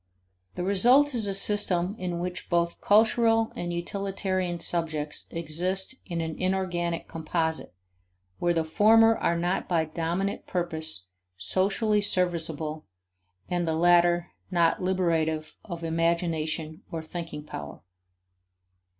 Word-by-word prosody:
The 180 - -3
result 245 +10 +4
is 225 -4 +2
a 200 - +1
system 195 -2 +1
in 180 -2 -3
which 180 0 -4
both 170 -1 0
"cultural" 225 +1 +3
and 175 0 -3
"utilitarian" 185 0 -2
subjects 160 -3 -2
exist 180 +6 -1
in 170 -3 -2
an 160 -1 -4
inorganic 175 -3 -1
composite 160 - -2 0.6
where 175 - +2
the 165 -1 +1
former 225 +7 +5
are 170 -5 0
not 175 +2 -1
by 165 -3 +2
dominant 170 +5 -3
purpose 160 - -1 0.3
socially 195 - +1
serviceable 165 -5 0 0.6
and 175 -1 -1
the 160 - 0
latter 175 +1 +3 0.2
not 170 -3 +2
liberative 165 -4 0
of 170 -4 -7
imagination 165 -1 -1
or 165 -1 -4
thinking 165 -2 -6
power. 75 - -8
175 Hz, 115 wpm, -27 LUFS, 160-190 Hz, 0.6 s, former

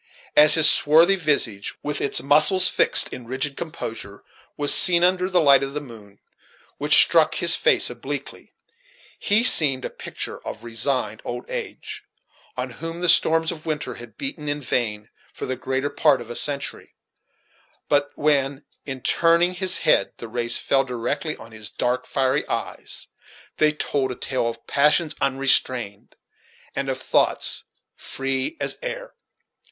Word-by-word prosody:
As 150 0 +8
his 160 -1 +6
swarthy 165 +6 +4
visage, 140 - -2
with 145 0 -4
its 140 - -1
muscles 155 +7 +4
fixed - - +4
in 125 -2 -10
rigid 135 +3 -3
composure, 115 -11 -8 0.3
was 145 -1 +2
seen 175 -2 +5
under 180 +1 +1
the 185 -2 +1
light 140 -4 +4
of 135 +1 -6
the - - -2
moon, 110 -8 -15 0.6
which - - +4
struck - - +5
his - - +5
face - - +2
obliquely, 135 +3 -7 0.7
he 210 +3 +1
seemed 140 - +6
a - - -6
picture - - -7
of 110 - -9
resigned 120 +3 -2
old 120 0 -7
age, - - -7 0.5
on 125 0 -5
whom 165 +7 -8
the 180 - -1
storms 165 0 +3
of 165 -1 -11
winter 150 -5 -4
had 120 0 -13
beaten 170 - -5
in 145 0 -3
vain 110 -5 -3 0.2
for - - -7
the 130 - -4
greater 130 +2 -4
part 150 -5 +1
of 120 - -10
a - - -6
century; 140 -1 -2 0.9
but 145 0 0
when, 140 -2 -1 0.2
in 135 -2 -6
turning 170 +5 +1
his 185 0 0
head, 100 - +1
the 115 - -9
rays 120 +1 -1
fell 135 -1 0
directly 135 +6 -4
on 115 - -14
his 110 -1 -6
dark, 125 +1 -3
fiery 135 +2 -1
eyes, - - -5 0.5
they 155 0 +3
told 140 -3 -3
a - - -7
tale 130 -2 -3
of 115 0 -8
passions 150 +3 +1
unrestrained, 130 -6 -1 0.6
and - - -4
of - - -4
thoughts - - +3 0.3
free 135 - -4
as - - -4
air. - - -7
140 Hz, 155 wpm, -21 LUFS, 125-160 Hz, 0.9 s, As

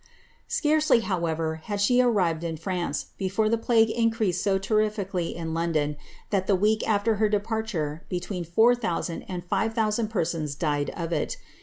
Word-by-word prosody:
Scarcely, 305 -5 +3
however, 165 -5 -1
had 205 -2 -3
she 245 +5 +4
arrived 185 -10 +2
in 165 -1 -3
France, 175 +2 -3
before 200 +3 +1
the 230 - +2
plague 225 -1 +3
in 230 0 +2
creased 215 -6 -1
so 195 -1 +2
terrifically 200 -3 -1
in 165 -1 -4
London, 160 -3 0 0.4
tliat 195 -2 +1
the 200 - +4
week 210 +3 +2
after 210 +1 +2
her 215 0 +2
departure 205 -7 -2
be 180 - -1
tween 180 0 -4
4000 185 -2 +1
and 180 -2 -6
5000 220 +3 0
persons 165 -8 -2
died 145 -1 0
of 170 0 -3
it. - - -1
195 Hz, 160 wpm, -26 LUFS, 170-220 Hz, 0.4 s, she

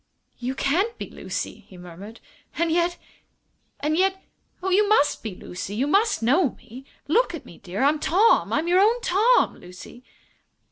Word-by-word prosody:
"You 255 +2 -3
can't 380 - 0
be - - -7
Lucy!" - - -6
he 185 - -14
murmured. 180 +6 -11 0.4
"And 335 0 +1
yet 345 +1 +1 0.8
and 300 +2 0
yet 380 +2 +1 0.4
oh, 380 - -1
you 405 +2 +3
must 360 -9 +3
be 215 -5 -6
Lucy! 185 +3 -7
You 250 +5 0
must 400 - +2
know 275 +4 +2
me! 255 +4 -13 0.2
Look 355 +4 +2
at 330 - -10
me, - - -14
dear 195 +5 -4
I'm 295 +2 +3
Tom. 400 +10 +3
I'm 320 - 0
your 360 +2 +4
own 445 +5 +4
Tom, 475 +2 +3
Lucy!" 185 +7 -13
320 Hz, 170 wpm, -24 LUFS, 235-390 Hz, 0.8 s, your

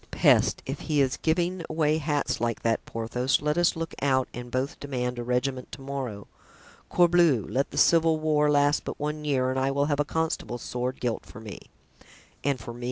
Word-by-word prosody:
"Peste, - - +3
if 135 +2 -4
he 150 -2 +2
is 135 -1 +2
giving 175 +2 0
away 155 -1 +1
hats 145 -4 -1
like 115 -1 -1
that, 115 -1 +1
Porthos, 120 +3 0
let 150 0 0
us 175 0 +3
look 165 0 -4
out 130 -2 +2
and 120 0 -7
both 130 +3 -2
demand 125 -3 -3
a - - -3
regiment 125 +1 -2
to 140 - -8
morrow. 130 -7 -5 0.6
Corbleu! 170 - +4
let 135 +2 0
the - - -9
civil 165 -1 +4
war 150 -1 +2
last 145 0 +3
but - - -6
one 150 +1 -3
year 130 -3 +1
and 130 - -1
I 135 +1 +1
will 140 +1 +1
have 145 -1 0
a - - +4
constable's 155 -6 -2
sword 125 +1 -3
gilt 120 -2 -2
for - - -11
me." 110 -3 -10 0.7
"And 140 -2 0
for 115 +1 -8
me?" 120 - -11
140 Hz, 200 wpm, -27 LUFS, 125-155 Hz, 0.7 s, Corbleu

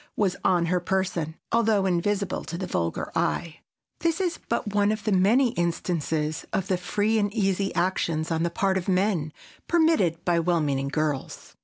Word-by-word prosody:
was 195 -4 +1
on 175 -2 +3
her 180 +2 +1
person, 180 -3 -1 0.2
although 220 -4 +3
invisible 190 +2 0
to 170 - -6
the 185 - -3
vulgar 85 - -2
eye. 165 -1 -1 0.4
This 335 0 0
is 355 -3 -1
but 220 -3 -1
one 205 0 +3
of 215 -1 -3
the 215 - 0
many 215 +8 +4
instances 165 - -1
of 195 - -2
the 185 - +2
free 210 +5 0
and 205 -1 0
easy 195 -2 0
actions 170 -3 0
on 160 0 0
the 170 - +1
part 190 +2 +1
of 175 - -8
men, 185 -5 +1 0.4
permitted 315 - +2
by 175 -1 +3
well 170 0 +2
meaning 140 -3 0
girls. 150 -1 -3
185 Hz, 175 wpm, -26 LUFS, 165-205 Hz, 0.4 s, many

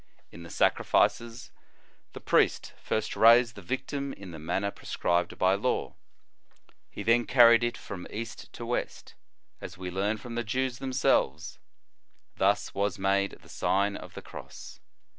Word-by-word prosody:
In 85 - -11
the 85 - -10
sacrifices, 115 +6 +1 0.6
the - - -8
priest - - +1
first 110 0 -2
raised 115 +1 +6
the 100 - -10
victim 135 - -4
in 95 -2 -10
the 80 - -9
manner 100 +6 -2
prescribed 85 -2 -1
by 95 +1 +3
law. 105 +6 -1 1.0
He 100 - -7
then 115 +2 +3
carried 120 -2 +6
it 120 0 -1
from 95 -4 -8
east 115 +1 -7
to 120 - -7
west, 120 +1 -4 0.5
as - - -8
we 90 -1 -6
learn 100 +4 -1
from 115 +3 -9
the 120 0 -2
Jews 125 +3 -2
themselves; 130 - 0 0.8
thus - - +1
was 100 +1 -1
made 100 +1 0
the - - -17
Sign 100 +1 0
of - - -10
the - - -8
Cross. - - -11
110 Hz, 150 wpm, -28 LUFS, 95-120 Hz, 1.0 s, raised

